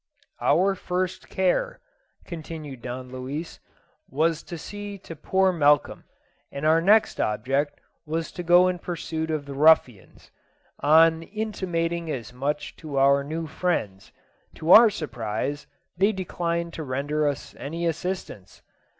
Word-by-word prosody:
"Our 195 +3 +3
first 185 -1 -3
care," 190 - 0 0.5
continued 155 -6 -8
Don 125 +1 -6
Luis, 135 +6 -6 0.5
"was 160 +3 +1
to 170 - -8
see 205 +4 -7
to 165 -3 -10
poor 190 +5 +2
Malcolm, 145 -3 +2 0.5
and 140 +2 -5
our 160 +1 +4
next 210 +5 +4
object 135 +7 -1 0.3
was 160 +1 -3
to - - -6
go 175 +1 +5
in 180 -1 -1
pursuit 160 -2 -4
of 155 -2 -2
the 140 - -7
ruffians. 135 - +2 0.5
On 160 +2 +5
intimating 170 -4 -3
as 125 -4 -5
much 145 +3 -3
to 150 -4 -6
our 140 +1 +4
new 160 +3 -4
friends, 150 - -2 0.4
to 160 +2 -1
our 225 +3 +10
surprise 140 - -4 0.3
they 195 +5 +3
declined 170 -3 -3
to 160 - -5
render 145 +3 -1
us 145 - -4
any 165 +4 -4
assistance. 170 - -4
160 Hz, 135 wpm, -25 LUFS, 140-175 Hz, 0.5 s, our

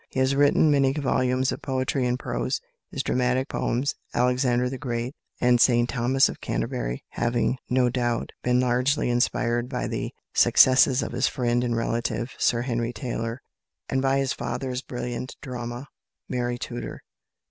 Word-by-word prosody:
He - - -3
has 130 +1 +3
written 145 +2 +4
many 135 -2 +3
volumes 130 -2 +1
of - - -5
poetry 130 -1 -1
and 125 0 0
prose, - - -2 0.3
his - - -3
dramatic 125 +1 +1
poems 130 +4 -1 0.2
"Alexander 125 0 +2
the 130 0 -5
Great" 120 -1 -3 0.3
and 125 -1 +4
"St 120 -1 +4
Thomas 130 +2 +3
of - - -7
Canterbury" - - -3
having, 120 +2 0
no 125 0 +3
doubt, 120 -1 -1
been 125 0 +2
largely 125 +2 +1
inspired 120 0 +1
by 125 -2 -2
the - - -3 0.2
successes 130 0 +5
of - - -4
his 120 - +1
friend 120 -1 0
and 120 -1 0
relative, 120 +1 -1
Sir 120 0 +2
Henry 120 -1 -2
Taylor, 115 -2 -4 0.5
and 130 - +1
by 135 0 +2
his 135 -1 0
father's 130 -2 -3
brilliant 125 -1 -5
drama, 120 0 -6 0.4
"Mary 120 -1 -2
Tudor." 120 -1 -6
125 Hz, 155 wpm, -25 LUFS, 120-130 Hz, 0.5 s, successes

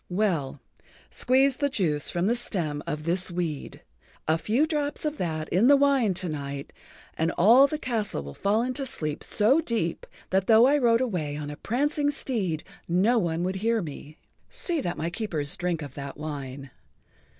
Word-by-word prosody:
"Well, 175 -8 0 0.5
squeeze 265 +1 +3
the 285 -1 +1
juice 155 - -1
from 175 +1 -1
the 225 - +3
stem 170 -11 -2
of 150 0 -3
this 175 +3 0
weed. 170 -5 -4 0.4
A 160 +1 +2
few 230 - +2
drops 295 -2 -2
of 300 0 -2
that 155 -3 -2
in 195 +7 +3
the 285 +1 +7
wine 275 -8 +3
to 185 0 -1
night 140 -2 -5 0.4
and 160 +1 0
all 240 +10 +6
the 305 - -3
castle 225 - -2
will 70 0 -8
fall 210 - +1
into 255 +3 -3
sleep 155 - -4
so 245 +10 +3
deep 225 - -2 0.2
that 190 0 +2
though 225 +1 +7
I 290 +3 +4
rode 235 -2 +3
away 165 - -2
on 145 -1 -5
a - - -6
prancing 290 - 0
steed 205 - -2 0.2
no 200 +8 +3
one 170 -3 -1
would 185 +1 -1
hear 225 +3 +1
me. 150 -3 -8 0.3
See 340 -4 -1
that 175 - -3
my 165 +2 -2
keepers 165 -9 -2
drink 175 -3 -2
of 140 -3 -8
that 140 0 -7
wine. 140 -3 -6
185 Hz, 180 wpm, -26 LUFS, 155-245 Hz, 0.5 s, the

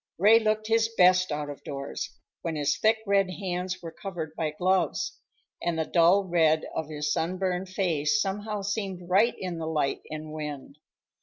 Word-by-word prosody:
Ray 215 +5 +7
looked 215 -1 0
his 225 0 +2
best 180 -1 +5
out 150 0 -2
of 145 - -11
doors, 140 -1 -5 0.2
when 165 -2 -3
his 145 -1 +1
thick 220 +1 +3
red 200 -2 +3
hands 185 -1 -4
were 165 - -6
covered 165 -5 -6
by 160 -2 -1
gloves, 185 +5 0 0.4
and 170 -1 -1
the 160 - 0
dull 175 +5 +4
red 160 -4 +2
of 160 -1 -3
his 150 -1 -1
sunburned 185 +2 -1
face 180 -2 +1
somehow 205 +1 -2
seemed 195 -3 -3
right 200 +6 +4
in 180 -3 -4
the 160 - -3
light 150 -3 0
and 155 0 -6
wind. 150 -2 -6
180 Hz, 170 wpm, -27 LUFS, 155-195 Hz, 0.4 s, Ray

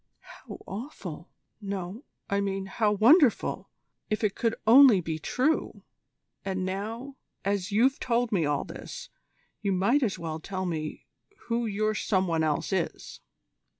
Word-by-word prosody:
"How - - -11
awful 190 - -7 0.3
no, 195 +3 -5 0.2
I 200 0 0
mean 195 -1 -2
how 210 +2 +1
wonderful 240 - +4 0.4
if 215 +1 -1
it 205 -2 +2
could 230 -1 0
only 240 -2 +8
be 160 -2 -4
true! 260 - -1 0.6
And 190 -1 -2
now, 225 +8 -5 0.3
as 200 0 -1
you've 250 +6 +3
told 240 -1 0
me 185 -6 +2
all 145 -1 0
this, - - -9 0.5
you 200 -2 0
might 200 +10 +2
as 220 -7 0
well 160 -1 -5
tell 185 +2 -4
me 155 -3 -4 0.4
who 235 0 0
your 215 +1 0
some 190 -3 +1
one 165 -2 +1
else 155 +4 0
is." 180 -4 -3
200 Hz, 145 wpm, -28 LUFS, 185-230 Hz, 0.6 s, only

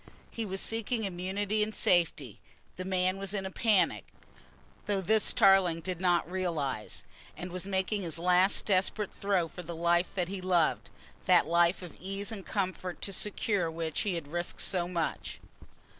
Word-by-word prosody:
He 225 -2 -4
was 190 0 -2
seeking 225 +1 -1
immunity 195 +3 -2
and 215 +1 -1
safety. 155 - +1 0.4
The 185 - -6
man 185 0 0
was 195 +1 -3
in 195 -1 -2
a 190 - -5
panic, 185 - +2 0.8
though 205 -2 +1
this 215 +3 +2
Tarling 190 -4 +4
did 180 0 -4
not 175 -3 +2
realise, 165 -11 -2 0.3
and 180 0 -6
was 185 +2 -4
making 195 +2 -1
his 170 -4 -2
last 180 +3 +3
desperate 195 +1 +1
throw 195 -4 0
for 180 - -9
the 170 0 -7
life 170 +3 +1
that 180 -3 0
he 190 0 -5
loved, 180 -4 +1 0.4
that 180 -2 +6
life 170 +3 +2
of 175 - -10
ease 195 +3 -4
and 205 -3 -5
comfort 185 -2 -3
to 195 - -2
secure 200 -3 0
which 160 -1 -3
he 200 -4 0
had 165 -4 -5
risked 175 +3 -2
so 175 -2 +2
much. 170 -3 -3
185 Hz, 170 wpm, -30 LUFS, 170-195 Hz, 0.8 s, that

